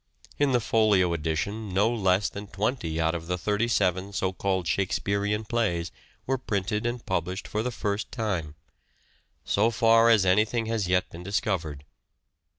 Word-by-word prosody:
In 145 -2 +3
the 125 - +3
Folio 105 -6 +3
edition 85 +7 -2
no 100 +3 +4
less 95 -3 +2
than 100 +1 -7
twenty 95 -5 -2
out 80 0 +1
of 85 -1 -5
the 90 0 -1
thirty 105 +6 0
seven, 95 -3 +1
so 95 -1 -1
called, 95 -2 -1
Shakespearean 100 +3 0
plays 90 -8 -1 0.3
were 135 0 0
printed 105 -1 -1
and 120 0 -4
published 95 +1 -2
for 105 - -2
the 125 - -1
first 105 -3 -3
time 95 - -3 0.5
— - - -39
so 105 +3 +4
far 115 0 +4
as 110 -5 +5
anything 110 +5 +2
has 110 -4 -1
yet 90 0 +1
been 85 - -9
discovered. 90 -7 -2
100 Hz, 160 wpm, -27 LUFS, 90-110 Hz, 0.5 s, as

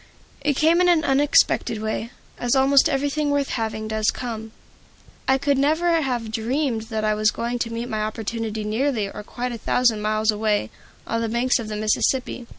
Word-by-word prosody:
It 290 0 +1
came 325 +5 +4
in 360 - +4
an 335 -3 +4
unexpected 270 -5 +2
way, 220 +1 -3 0.3
as 245 +1 +1
almost 270 +1 +5
everything 285 +2 0
worth 285 -1 0
having 220 -2 -3
does 220 0 0
come. 225 -3 -5 0.8
I 265 - +4
could 280 0 +1
never 325 +4 +2
have 240 -5 -2
dreamed 230 0 -1
that 220 -2 -2
I 215 0 +2
was 215 0 +2
going 235 +2 -3
to 235 - -2
meet 230 +1 -4
my 215 -3 -2
opportunity 220 0 -3
nearly 215 -1 -1
or - - -7
quite 245 +4 -5
a 235 - -6
thousand 235 -2 +2
miles 215 +1 +1
away, 210 - 0 0.3
on 230 0 -2
the 230 - -1
banks 240 +3 +1
of 225 - -5
the 215 - -4
Mississippi. 240 +3 0
235 Hz, 185 wpm, -23 LUFS, 220-270 Hz, 0.8 s, almost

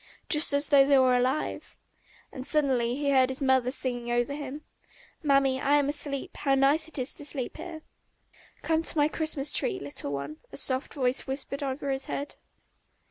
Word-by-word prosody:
"Just 300 0 +5
as 285 +1 +1
though 280 -2 +7
they 275 0 +4
were 255 -1 +4
alive!..." 255 +4 -2 0.5
And 260 - -7
suddenly 260 -5 +1
he 285 0 -1
heard 260 -1 +4
his 265 - -5
mother 260 -3 +2
singing 245 -2 -1
over 240 +3 0
him. 290 +1 -7 0.6
"Mammy, 275 -3 +2
I 285 +1 +3
am 285 -1 +1
asleep; 290 -2 -3
how 275 -2 +1
nice 280 +4 +3
it 320 - -6
is 255 +1 -2
to - - -8
sleep 280 -4 -4
here!" 315 -1 -8 0.8
"Come 320 0 +1
to 330 - -1
my 295 0 +4
Christmas 310 -2 0
tree, 130 - 0
little 140 0 -5
one," 140 +2 -5
a - - -7
soft 260 +1 +1
voice 255 -2 +1
suddenly 265 - -3
whispered 275 +1 -5
over 275 0 -3
his 270 0 -2
head. 285 +1 -5
275 Hz, 190 wpm, -27 LUFS, 255-290 Hz, 0.8 s, though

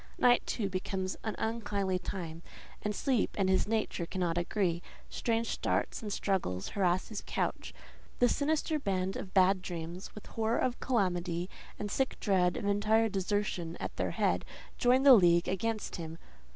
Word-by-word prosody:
Night, 245 -1 +5
too, 210 -4 -1
becomes 190 0 -3
an 220 -2 -2
unkindly 205 -4 -1
time, 170 -3 -5 0.4
and 210 0 -2
sleep 255 -3 +1
and 195 -2 +2
his 190 - +2
nature 215 -6 -1
cannot 175 -3 -1
agree: 175 -1 0 0.3
strange 230 -1 0
starts - - -1
and 210 -2 -5
struggles 180 - -1
harass 185 -2 +1
his 215 -2 -4
couch: - - -2 0.5
the 245 - +5
sinister 305 +3 +1
band 190 -6 -1
of 185 - -7
bad 190 0 +5
dreams, 175 +1 -6
with 210 - -9
horror 225 +1 -1
of 250 -1 0
calamity, 180 -6 0 0.3
and 205 -1 -4
sick 265 -1 0
dread 180 -4 +2
of 215 - -4
entire 215 +2 +3
desertion 190 -3 -1
at - - -5
their - - 0
head, - - +1 0.4
join 250 +2 +4
the 275 -2 +10
league 175 -5 +5
against 215 +3 -2
him. 165 -1 -6
195 Hz, 160 wpm, -31 LUFS, 180-225 Hz, 0.5 s, the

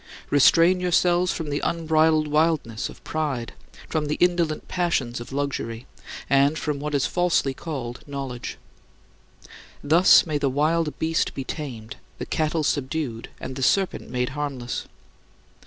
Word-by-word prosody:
Restrain 165 +5 +5
yourselves 180 0 +2
from 155 -3 -4
the 145 - 0
unbridled 160 -1 +2
wildness 150 -7 0
of - - -14
pride, 145 -7 -3 0.3
from 155 -2 -1
the 150 - 0
indolent 175 -3 +1
passions 140 -10 -1
of 120 - -9
luxury, 135 -4 -3 0.4
and 140 +3 +3
from 150 -3 -2
what 150 0 -3
is 140 - +2
falsely 175 -6 +1
called 130 -5 -6
knowledge. 135 -4 -5 1.3
Thus 165 +5 +6
may 155 -3 -1
the 140 - +1
wild 155 +3 0
beast 160 +1 0
be 135 - -3
tamed, 125 -7 -6 0.2
the - - -5
cattle 155 0 0
subdued, 140 -4 -2
and 130 - -6
the 135 - -5
serpent 190 +8 +1
made 125 0 -1
harmless. 135 -3 -4
150 Hz, 140 wpm, -24 LUFS, 130-160 Hz, 1.3 s, Thus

